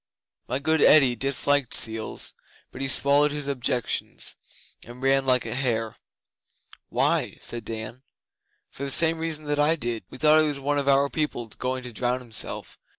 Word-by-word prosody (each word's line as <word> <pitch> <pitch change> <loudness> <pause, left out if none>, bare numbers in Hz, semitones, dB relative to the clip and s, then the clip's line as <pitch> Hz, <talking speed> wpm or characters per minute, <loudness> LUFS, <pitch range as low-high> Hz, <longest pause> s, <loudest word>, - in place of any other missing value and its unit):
My 130 - -1
good 160 +3 0
Eddi 135 -5 +6
disliked 140 +1 +1
seals 110 -1 +1 0.4
but 130 - -9
he 135 - -1
swallowed 140 +2 +3
his 145 -1 -5
objections 125 -4 -2 0.5
and 120 +2 -12
ran 135 0 +2
like 125 -1 +3
a - - -4
hare.' 115 -4 -2 0.9
'Why?' - - 0
said 120 -2 -4
Dan. 115 +3 -6 0.7
'For 140 - -8
the 140 - -3
same 165 +3 +3
reason 160 -2 -4
that 145 0 -1
I 150 +3 +3
did. 120 - -4
We - - -11
thought 155 +2 +5
it 155 - +3
was 145 -2 -3
one 145 +1 0
of 140 - -2
our 140 0 +4
people 150 -5 -2
going 130 +3 -4
to 125 -1 -8
drown 125 +2 -1
himself. 120 -4 -3
135 Hz, 170 wpm, -25 LUFS, 120-145 Hz, 0.9 s, Eddi